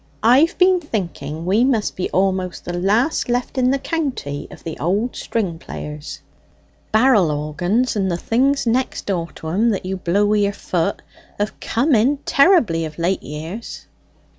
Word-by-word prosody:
I've 260 +8 +5
been 365 0 +5
thinking 170 - -4
we 200 +6 +3
must 245 -5 +1
be 185 - -2
almost 185 -1 -1
the 175 - -4
last 210 - +1
left 245 +2 -1
in 250 0 +3
the 275 - +2
county 265 - -3
of - - -13
the 160 - -5
old 200 - 0
string 190 -8 -2
players? 150 -1 -7 0.7
Barrel 220 -6 +4
organs, 175 +12 0
and 195 -2 0
the 170 - -1
things 265 +9 +1
next 250 +3 0
door 175 -4 -1
to 160 - -7
'em 210 +8 +2
that 200 -4 -2
you 190 +1 -3
blow 185 +3 +1
wi' 210 +1 +2
your 200 -1 +1
foot, 180 0 -2 0.4
have 205 +1 -2
come 270 +6 +1
in 250 +6 +3
terribly 275 - +4
of 155 -1 -6
late 175 +3 0
years." 160 - -7
205 Hz, 165 wpm, -20 LUFS, 170-250 Hz, 0.7 s, I've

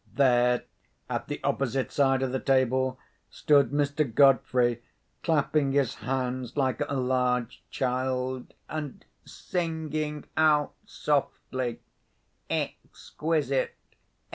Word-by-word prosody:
There, 125 -2 +3 0.5
at - - -2
the - - -4
opposite 135 -1 0
side 135 -2 +2
of 130 - -1
the 130 - -1
table, 130 -1 +2 0.3
stood 145 -3 +3
Mr. 145 +1 +1
Godfrey, 125 -2 +4 0.4
clapping 150 -3 +1
his 140 -4 +2
hands 125 +1 -3
like 135 0 +1
a 140 - -1
large 125 -2 0
child, 130 0 -2
and 150 -3 -6 0.2
singing 155 -3 -3
out 155 -2 +3
softly, 130 -4 -2 0.7
"Exquisite! 150 -4 -2
135 Hz, 95 wpm, -27 LUFS, 125-145 Hz, 0.7 s, Godfrey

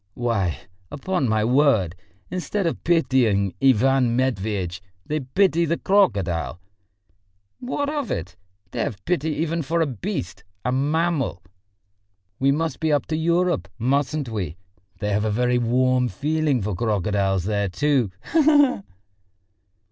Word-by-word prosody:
"Why, 110 -9 -1 0.3
upon 145 -2 -1
my 110 0 +2
word! 120 - +3 0.4
Instead 185 +3 -2
of 165 - -2
pitying 125 - +2
Ivan 130 -1 +3
Matveitch, 100 -8 -1 0.2
they 155 +1 -1
pity 170 +5 +2
the 170 +1 0
crocodile!" 100 - +1 1.0
"What 265 +3 -2
of 290 -4 -2
it? 90 0 -4 0.4
They - - -5
have 120 -9 -3
pity 160 -3 0
even 165 +1 -1
for 165 +3 -1
a 165 - +3
beast, 130 - -5 0.2
a 125 - +1
mammal. 145 - 0 1.0
We 135 +1 +3
must 155 0 -1
be 160 -1 0
up 145 - +2
to 155 - 0
Europe, 170 - +1
mustn't 140 +3 0
we? 95 -7 -4 0.4
They 105 +2 -2
have 105 +1 +1
a 110 - 0
very 125 +3 +1
warm 125 +1 +2
feeling 145 +3 0
for 105 +1 -2
crocodiles 100 -2 0
there 100 0 -1
too. 135 +2 +1 0.2
He 325 - +5
he 300 0 +5
he!" 275 -5 +4
130 Hz, 140 wpm, -23 LUFS, 105-160 Hz, 1.0 s, He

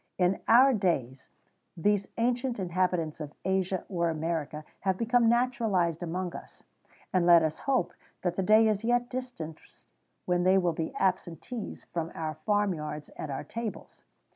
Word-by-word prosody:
In 180 +1 +2
our 260 +4 +7
days 135 - -1 0.5
these 200 +3 +1
ancient 245 +1 0
inhabitants 180 -4 -1
of 150 -1 -7
Asia 190 -1 0
or 170 -3 0
America[XVII 155 -1 -3
111] - - -32
have 190 -1 0
become 235 +1 +3
naturalized 225 -9 +1
among 175 +1 -3
us, - - -11 0.5
and 185 -2 +3
let 170 -1 +8
us 155 0 -1
hope 265 -2 +1 0.3
that 175 -1 0
the 190 - 0
day 215 +3 +5
is 215 0 0
yet 240 +1 +1
distant 245 -12 -6 0.7
when 180 -1 +1
they 185 +2 +4
will 175 -3 +2
be 160 0 -3
absentees 190 - -2
from 165 0 -4
our 155 -1 -3
farm 205 +3 +1
yards 150 -2 -6
and 155 - -7
our 135 - -4
tables. 230 -2 -7
185 Hz, 160 wpm, -29 LUFS, 165-225 Hz, 0.7 s, let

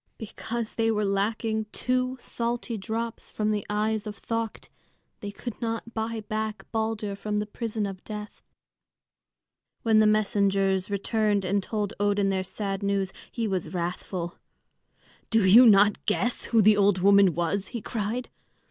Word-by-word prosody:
Because 225 +1 -5
there 225 -1 +1
were 210 0 +1
lacking 220 +2 0
two 255 +1 -1
salty 235 0 -3
drops 225 +2 -4
from 215 0 -1
the 210 -2 -1
eyes 215 +1 0
of 210 -1 -7
Thökt, 230 -1 -4 0.5
they 205 - -5
could 220 +4 -7
not 230 0 -3
buy 225 0 -3
back 215 0 -4
Balder 220 -2 -2
from 210 +1 -3
the 210 - 0
prison 220 0 -3
of 195 -2 -6
death. 210 -1 -8 1.4
When 220 -1 +4
the 215 - +5
messengers 200 -2 +2
returned 205 0 0
and 200 +2 +1
told 205 0 -3
Odin 205 -1 +2
their 190 -1 0
sad 195 +1 -3
news, 200 -1 0 0.2
he 230 -2 -2
was 185 -4 -2
wrathful. 175 0 -4 0.9
"Do 225 -3 +3
you 230 +7 +9
not 205 -1 +5
guess 235 +3 0
who 225 -2 +3
the 210 +1 +6
old 200 -1 +4
woman 195 -1 +5
was?" 175 +4 -1
he 235 - -5
cried. 225 +3 -3
210 Hz, 150 wpm, -27 LUFS, 200-225 Hz, 1.4 s, you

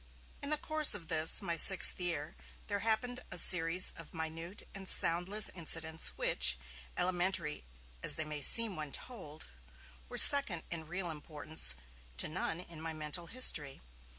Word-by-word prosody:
In 285 - -3
the 305 - -1
course 310 -4 +1
of 170 -6 -11
this, 160 0 +4
my 170 - -2
sixth 190 +4 +4
year, 165 -5 -1 0.3
there 205 -1 -5
happened 225 +3 -3
a - - -2
series 175 +1 +3
of 165 -1 -14
minute 165 +4 -8
and 195 -1 -9
soundless 180 +5 +4
incidents 160 -2 -2
which, 65 0 +1 0.4
elementary 180 - -3 0.4
as - - +4
they 155 - -4
may 150 -1 -7
seem 225 - +4
when 150 -2 -7
told, 160 - -9 0.6
were - - -9
second 275 - +6
in 160 -2 -7
real 175 0 -5
importance 150 - -1 0.4
to - - -1
none 165 0 -5
in 165 -3 -12
my 165 0 -6
mental 155 +2 -6
history. 155 - 0
170 Hz, 150 wpm, -31 LUFS, 155-195 Hz, 0.6 s, second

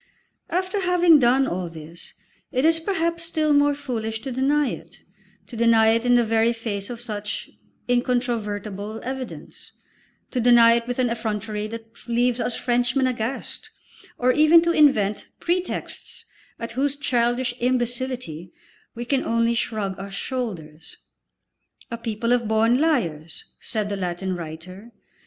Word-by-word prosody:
After 370 +3 -1
having 355 -4 +5
done 260 +2 +4
all 180 -7 -3
this 165 +1 -10 0.4
it 260 +1 +1
is 325 0 +4
perhaps 335 -1 -1
still 315 -2 +1
more 290 0 +4
foolish 225 -6 -4
to 270 - -5
deny 275 +2 +2
it, - - -9 0.5
to 240 - -11
deny 225 -1 +5
it 230 +2 +2
in 245 - +5
the 240 - +5
very 225 +1 +2
face 210 -4 -4
of 240 -2 -6
such 210 -3 -5 0.4
incontrovertible 220 -4 -1
evidence, 260 0 -7 0.6
to 255 - -1
deny 235 -1 +7
it 235 0 0
with 245 - -3
an 250 -2 +1
effrontery 215 -2 -3
that 225 +1 -11
leaves 240 +1 +1
us 240 - -1
Frenchmen 245 +2 +1
aghast, 250 0 -3 0.5
or 250 +1 +3
even 310 +4 +6
to 340 - +2
invent 245 -11 +3
pretexts 355 +1 -3 0.3
at 230 0 -6
whose 275 +4 0
childish 245 -2 0
imbecility 245 - -2 0.4
we 240 +1 -5
can 265 +1 +1
only 230 0 +1
shrug 210 -5 -2
our 195 +1 -6
shoulders. 190 - -5 0.9
"A 235 - -3
people 230 +1 -1
of 240 -2 +1
born 225 +3 +3
liars," 170 - 0
said 215 -3 -2
the 200 -1 -3
Latin 185 0 -2
writer. 175 +7 -9
235 Hz, 140 wpm, -23 LUFS, 215-260 Hz, 0.9 s, deny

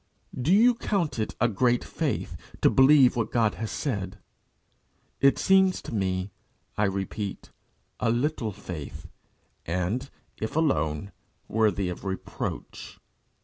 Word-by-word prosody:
Do 130 +6 0
you 230 +6 +6
count 195 - -1
it 110 - -2
a 120 - +4
great 120 +3 +2
faith - - -3 0.3
to - - +6
believe 135 -1 +6
what 115 -2 -1
God 110 -3 +2
has 110 - -2
said? 100 -8 -3 1.0
It 135 0 +5
seems 190 -1 +4
to - - -7
me, 95 -1 -1 0.4
I 105 - +2
repeat, 100 +1 -4 0.5
a - - +1
little 120 -1 0
faith, 85 -6 -8 0.6
and, 90 - -2 0.3
if 110 +4 -4
alone, 80 - 0 0.4
worthy 105 -3 +1
of 90 - -6
reproach. 95 -9 -5
110 Hz, 125 wpm, -27 LUFS, 95-135 Hz, 1.0 s, you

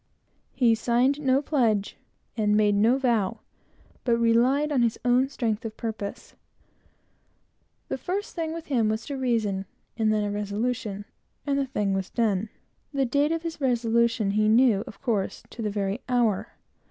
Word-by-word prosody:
He 240 -3 +4
signed 245 +5 +2
no 270 0 +2
pledge, 225 -9 +1 0.4
and 210 -2 +2
made 210 -1 +3
no 220 +6 +4
vow, 235 -8 0 0.6
but 235 -2 +2
relied 245 +6 +3
on 270 -4 +2
his 230 -2 +1
own 250 +2 +3
strength 230 -4 -2
of 220 -1 -6
purpose. 220 -3 -5 1.5
The - - -3
first 385 - -3
thing 325 -2 -3
with 330 0 -6
him 235 -8 +1
was 220 +1 -3
a - - -2
reason, 220 -7 -1 0.3
and 220 -1 +2
then 215 -1 +1
a 205 - -2
resolution, 205 0 -3 0.4
and 280 -1 +1
the 275 - -1
thing 205 -6 -1
was 195 -1 -2
done. 215 -2 0 0.4
The 275 -2 +1
date 285 +5 +1
of 330 0 -2
his 330 -2 -5
resolution 235 -4 +2
he 215 +1 +2
knew, 225 -3 +4
of 200 - -11
course, 215 -7 -1
to 235 - -7
the 215 - -1
very 200 +2 -2
hour. 225 -4 +1
230 Hz, 165 wpm, -26 LUFS, 210-260 Hz, 1.5 s, He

